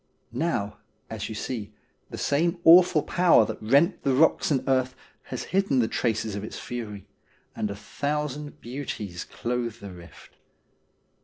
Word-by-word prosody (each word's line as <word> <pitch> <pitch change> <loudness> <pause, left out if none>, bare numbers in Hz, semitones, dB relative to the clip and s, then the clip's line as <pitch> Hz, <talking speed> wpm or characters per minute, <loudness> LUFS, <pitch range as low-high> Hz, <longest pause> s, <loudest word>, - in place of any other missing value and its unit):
Now, 125 -7 -2 0.3
as - - -4
you 110 - -5
see, 110 -2 -5 0.4
the - - -7
same 170 +5 +1
awful 170 -2 +7
power 175 -10 +4
that - - -6
rent 140 - +3
the 135 -2 +1
rocks 160 +4 +3
and 140 -4 0
earth 130 -1 +1 0.3
has - - -5
hidden 195 -8 +2
the 120 -3 +3
traces 110 -3 -1
of 100 - -5
its 110 - -7
fury, 105 -5 -6 0.5
and 105 - -2
a 100 - -5
thousand 145 +6 -4
beauties 110 -8 -5
clothe 120 -2 -3
the 100 -1 -9
rift. 85 -2 -15
125 Hz, 150 wpm, -26 LUFS, 105-150 Hz, 0.5 s, awful